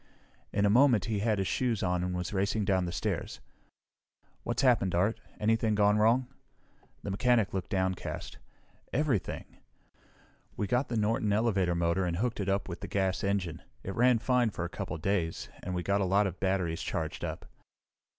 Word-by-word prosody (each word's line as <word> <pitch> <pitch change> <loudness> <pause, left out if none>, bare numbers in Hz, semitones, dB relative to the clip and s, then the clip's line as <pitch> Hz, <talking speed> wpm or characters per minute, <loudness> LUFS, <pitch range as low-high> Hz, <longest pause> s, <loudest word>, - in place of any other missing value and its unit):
In 100 0 +1
a - - +4
moment 120 -5 +5
he 110 -3 -1
had 110 0 +1
his 95 -1 0
shoes 120 -5 0
on 90 -1 0
and 90 0 -2
was 90 +2 -3
racing 100 +2 0
down 95 -2 +2
the 85 - -3
stairs. 85 - -3 1.0
"What's - - -2
happened, 115 -9 +3
Art? 100 +6 +1 0.2
Anything 110 0 +2
gone 105 0 +4
wrong?" 115 +4 +4 0.8
The 100 - -3
mechanic 115 0 +2
looked 95 -2 -3
downcast. 95 -1 -2 0.5
"Everything! 135 -8 -1 1.1
We 105 - 0
got 125 +5 0
the 115 - -1
Norton 105 0 +1
elevator 100 -5 +2
motor 85 +2 +1
and 85 -2 -1
hooked 120 +3 -1
it 100 -1 -1
up 100 0 0
with 85 - -6
the - - -5
gas 95 -1 0
engine. 95 -5 -1 0.2
It 95 - -4
ran 125 +3 +4
fine 125 0 +2
for 90 -4 -4
a - - -4
couple - - -5
of 80 - -9
days, 90 -5 -1
and 90 - -4
we 90 - -2
got 100 +2 +1
a - - +2
lot 100 +3 +3
of 95 -2 -4
batteries 95 -4 0
charged - - -3
up." - - -4
100 Hz, 185 wpm, -30 LUFS, 90-110 Hz, 1.1 s, moment